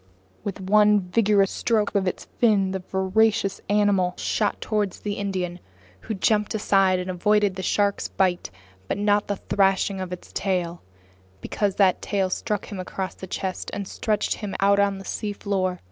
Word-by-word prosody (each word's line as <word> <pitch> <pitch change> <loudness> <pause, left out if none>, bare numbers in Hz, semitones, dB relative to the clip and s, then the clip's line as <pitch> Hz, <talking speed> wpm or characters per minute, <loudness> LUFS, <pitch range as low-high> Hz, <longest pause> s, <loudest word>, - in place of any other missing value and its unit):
With 200 -1 -4
one 210 +2 +5
vigorous 195 +1 +2
stroke 215 -4 0
of 195 -2 +1
its 185 - -3
fins, 200 -5 +3
the 190 - -2
voracious 195 +2 +1
animal 205 -3 +2
shot 210 -2 -1
toward 210 -3 -1
the 205 - -4
Indian, 185 -3 -3 0.4
who 215 - -5
jumped 210 +2 +1
aside 195 -3 +3
and 180 0 -4
avoided 205 +2 +2
the 190 - -4
shark's 200 +1 +1
bite 180 -2 0 0.4
but - - -2
not 205 0 +2
the 205 - -1
thrashing 195 0 +1
of 185 -1 -5
its 180 - -8
tail, 175 -3 -1 0.6
because 200 - -1
that 190 -3 +3
tail 195 -2 -1
struck 210 +2 -2
him 200 - -5
across 185 +1 -4
the 190 - -9
chest 185 0 -4
and 200 -1 -4
stretched 210 0 -1
him 205 -3 -6
out 200 +1 +4
on 200 -1 +2
the 195 - -10
seafloor. 200 -3 -2
195 Hz, 165 wpm, -24 LUFS, 185-205 Hz, 0.6 s, one